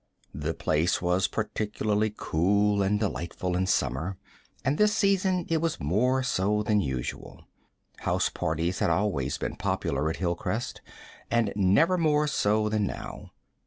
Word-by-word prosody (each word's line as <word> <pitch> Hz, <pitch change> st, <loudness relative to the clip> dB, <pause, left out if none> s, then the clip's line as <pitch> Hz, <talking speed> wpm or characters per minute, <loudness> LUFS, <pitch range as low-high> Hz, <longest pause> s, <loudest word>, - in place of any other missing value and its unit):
The 75 Hz, +3 st, -3 dB
place 80 Hz, +4 st, +1 dB
was 90 Hz, +1 st, +1 dB
particularly 105 Hz, 0 st, -1 dB
cool 100 Hz, +5 st, +2 dB
and 100 Hz, +2 st, +1 dB
delightful 90 Hz, -3 st, -2 dB
in 95 Hz, +1 st, 0 dB
summer, 80 Hz, -, 0 dB, 0.5 s
and 140 Hz, +3 st, +1 dB
this 210 Hz, 0 st, +4 dB
season 190 Hz, -3 st, +2 dB
it 165 Hz, -1 st, +1 dB
was 165 Hz, -1 st, -1 dB
more 125 Hz, -, +1 dB
so 105 Hz, -3 st, +1 dB
than 105 Hz, -1 st, +2 dB
usual. 65 Hz, -4 st, -5 dB, 0.5 s
House -, -, +1 dB
parties 80 Hz, +3 st, -2 dB
had -, -, +2 dB
always 85 Hz, -7 st, 0 dB
been -, -, -4 dB
popular 80 Hz, -, -1 dB
at 80 Hz, -, -3 dB
Hilcrest, 90 Hz, +6 st, -2 dB, 0.5 s
and 115 Hz, -3 st, +1 dB
never 105 Hz, -, +3 dB
more 150 Hz, -2 st, +3 dB
so 105 Hz, -6 st, +1 dB
than 105 Hz, -1 st, 0 dB
now. -, -, -7 dB
105 Hz, 140 wpm, -27 LUFS, 85-120 Hz, 0.5 s, this